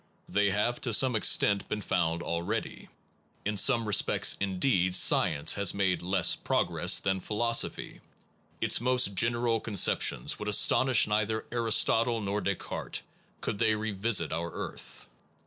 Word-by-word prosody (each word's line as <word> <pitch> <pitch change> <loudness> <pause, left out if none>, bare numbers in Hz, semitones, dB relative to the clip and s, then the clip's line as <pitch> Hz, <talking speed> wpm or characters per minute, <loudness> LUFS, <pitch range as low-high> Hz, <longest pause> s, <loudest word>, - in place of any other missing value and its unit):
They 100 +2 0
have, 105 +5 -2
to 120 - -2
some 130 +2 +3
extent, 100 -2 +2
been 105 - -4
found 85 -2 -2
already. 85 +7 -5 0.6
In 105 +1 -2
some 115 +2 +3
respects, 105 -2 +1
indeed, 95 -1 0
science 75 -5 +3
has 100 -2 0
made 95 -2 0
less 95 +3 +1
progress - - 0
than 95 0 -2
philosophy 115 +5 -2 0.6
its - - +1
most 125 -4 +2
general 115 +3 0
conceptions 105 -4 +1
would 105 - -6
astonish 125 +4 +4
neither 110 +1 -2
Aristotle 115 0 +1
nor 105 0 -3
Descartes, 100 -2 -5 0.4
could 100 - -5
they 110 -2 +2
revisit 105 -5 -1
our 85 +1 -4
earth. - - -9
105 Hz, 130 wpm, -28 LUFS, 95-115 Hz, 0.6 s, astonish